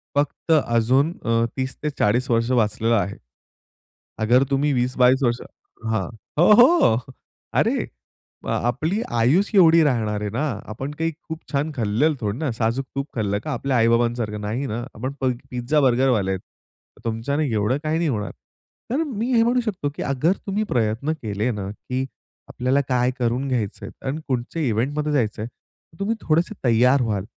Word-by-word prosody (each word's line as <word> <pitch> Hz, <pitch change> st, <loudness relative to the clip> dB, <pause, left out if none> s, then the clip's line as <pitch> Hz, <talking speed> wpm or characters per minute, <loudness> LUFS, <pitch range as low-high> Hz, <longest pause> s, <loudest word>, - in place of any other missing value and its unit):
फक्त 145 Hz, +3 st, -1 dB
अजून 130 Hz, +1 st, +3 dB
अ, 115 Hz, 0 st, +2 dB
30-40 130 Hz, -3 st, -1 dB
वर्ष 115 Hz, +1 st, +2 dB
वाचलेला 115 Hz, -1 st, +2 dB
आहे. 100 Hz, +2 st, -5 dB, 1.1 s
अगर 120 Hz, +4 st, +4 dB
तुम्ही 140 Hz, +1 st, +2 dB
20-22 125 Hz, +1 st, +3 dB
वर्ष 120 Hz, -1 st, +1 dB, 0.5 s
हां. 110 Hz, -4 st, -1 dB, 0.3 s
हो, 175 Hz, -, +6 dB
हो. 245 Hz, -, +6 dB, 0.6 s
अरे, -, -, +2 dB, 0.6 s
आ -, -, +1 dB
आपली 155 Hz, -, 0 dB, 0.2 s
आयुचं 170 Hz, -, +3 dB
एवढी 165 Hz, -2 st, +7 dB
राहणार 110 Hz, -6 st, 0 dB
आहे 105 Hz, -, -3 dB
ना, 125 Hz, +9 st, -1 dB, 0.3 s
आपण 130 Hz, +6 st, -5 dB
काही 165 Hz, 0 st, 0 dB, 0.2 s
खूप 160 Hz, 0 st, -4 dB
छान 145 Hz, +2 st, 0 dB
खाल्लेल 120 Hz, +7 st, +1 dB
थोडं 105 Hz, +1 st, -2 dB
ना, 155 Hz, -3 st, -1 dB
साजूक 115 Hz, +3 st, -1 dB
तूप 140 Hz, -, -1 dB
खाल्लं 100 Hz, -3 st, 0 dB
का 155 Hz, -, -3 dB
आपल्या 135 Hz, -2 st, -1 dB
आई-बाबांसारखं. 115 Hz, -2 st, +1 dB
नाही 110 Hz, +7 st, -2 dB
ना? 115 Hz, -2 st, -3 dB
आपण 130 Hz, +5 st, -4 dB
प -, -, -3 dB, 0.3 s
पिझ्झा-बर्गरवाले 125 Hz, -4 st, +2 dB
आहेत. 95 Hz, -1 st, -2 dB, 0.6 s
तुमच्याने 120 Hz, +7 st, -1 dB
एवढं 110 Hz, +5 st, +1 dB
काही 155 Hz, +1 st, 0 dB
नाही 170 Hz, -2 st, +1 dB
होणार. 105 Hz, -7 st, -2 dB, 0.6 s
तर 275 Hz, +6 st, +1 dB
मी 250 Hz, -3 st, -2 dB
हे 230 Hz, -, +5 dB
म्हणू 245 Hz, +2 st, +2 dB
शकतो, 190 Hz, -10 st, -2 dB
की -, -, -4 dB
अगर 140 Hz, +6 st, +1 dB
तुम्ही 200 Hz, +2 st, 0 dB
प्रयत्न 115 Hz, +5 st, 0 dB
केले 105 Hz, +2 st, -1 dB
ना, 100 Hz, -4 st, -4 dB
की 125 Hz, +5 st, -4 dB, 0.4 s
आपल्याला 130 Hz, +3 st, +1 dB
काय 125 Hz, -1 st, +2 dB
करून 125 Hz, +3 st, 0 dB
घ्यायचंय 115 Hz, -6 st, -3 dB, 0.2 s
आणि 145 Hz, +4 st, -2 dB
कुठच्या 130 Hz, +5 st, -2 dB
इव्हेंटमध्ये 145 Hz, +6 st, 0 dB
जायचं 110 Hz, -6 st, 0 dB
आहे, 115 Hz, -, -4 dB
तर 160 Hz, +6 st, -29 dB
तुम्ही 215 Hz, +3 st, 0 dB
थोडेसे 165 Hz, +6 st, +1 dB
तयार 125 Hz, +3 st, +4 dB
व्हाल 105 Hz, -5 st, -1 dB
125 Hz, 160 wpm, -23 LUFS, 115-150 Hz, 1.1 s, एवढी